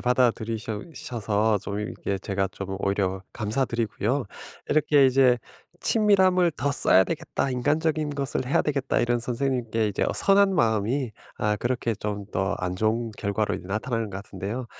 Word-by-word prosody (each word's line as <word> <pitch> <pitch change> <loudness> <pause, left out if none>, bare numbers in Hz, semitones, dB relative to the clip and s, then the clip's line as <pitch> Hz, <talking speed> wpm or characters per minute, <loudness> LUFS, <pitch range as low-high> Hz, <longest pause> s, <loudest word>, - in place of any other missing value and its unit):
받아들이셔 115 -3 0
셔서 110 -3 0
좀 100 +1 -5
이렇게 100 -1 -3
제가 95 -1 -1
좀 95 0 -5
오히려 95 -1 -1
감사드리고요. 115 +2 -1 0.5
이렇게 145 -2 +4
이제 130 -1 +5 0.4
'친밀함을 190 -5 +4
더 140 0 -1
써야 95 -8 +5
되겠다. 160 -4 -2
인간적인 155 +4 0
것을 135 -2 -2
해야 135 - +2
되겠다.' 140 -3 0
이런 120 0 +1
선생님께 120 -3 -1
이제 100 - -2
어 - - 0
선한 195 -1 +4
마음이 115 - +1 0.2
아 105 0 0
그렇게 120 -1 -1
좀 105 -1 -4
더 95 +1 0
안 90 0 -2
좋은 110 +3 0
결과로 105 +1 -1
이제 90 - -7
나타나는 110 +2 -2
것 95 - -6
같은데요. 100 +6 -5
115 Hz, 350 characters per minute, -25 LUFS, 105-135 Hz, 0.5 s, 이제